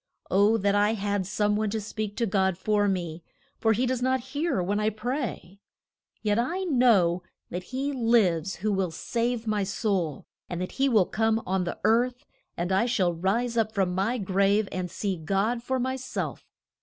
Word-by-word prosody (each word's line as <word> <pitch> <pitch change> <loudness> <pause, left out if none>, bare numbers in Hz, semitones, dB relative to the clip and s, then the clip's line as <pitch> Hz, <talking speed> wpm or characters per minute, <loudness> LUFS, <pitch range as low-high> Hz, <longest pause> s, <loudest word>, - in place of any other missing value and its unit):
O, 205 +4 +4
that 200 -1 +1
I 205 +1 +3
had 200 -2 -1
some 210 0 +1
one 215 0 0
to 220 +2 -2
speak 215 0 -5
to 235 - +1
God 190 -3 +1
for 205 +2 +1
me, 175 -4 -2 0.4
for 225 -1 +3
he 245 +4 +1
does 255 -1 -1
not 260 +1 +2
hear 305 - 0
when 200 +4 0
I 215 0 +2
pray. 220 - -4 0.6
Yet 210 0 +2
I 345 +11 -1
know 230 - +3 0.3
that 180 +1 -4
he 270 +5 -2
lives 200 - +2
who 210 +4 -1
will 190 -2 0
save 235 +7 -2
my 210 -2 0
soul, 195 - -1 0.2
and 175 - -3
that 180 - -3
he 275 +1 +1
will 215 -7 +4
come 220 +2 +1
on 185 0 0
the 175 - -4
earth, 245 +2 +2 0.3
and 175 +2 -2
I 195 +5 +3
shall 185 -7 +1
rise 215 +8 0
up 220 -1 +1
from 190 -3 +1
my 200 +7 0
grave 200 +1 +2
and 180 -1 -3
see 195 +1 -2
God 200 +8 0
for 260 +2 -1
my 260 +1 -1
self. 260 0 -5
210 Hz, 190 wpm, -27 LUFS, 190-235 Hz, 0.6 s, O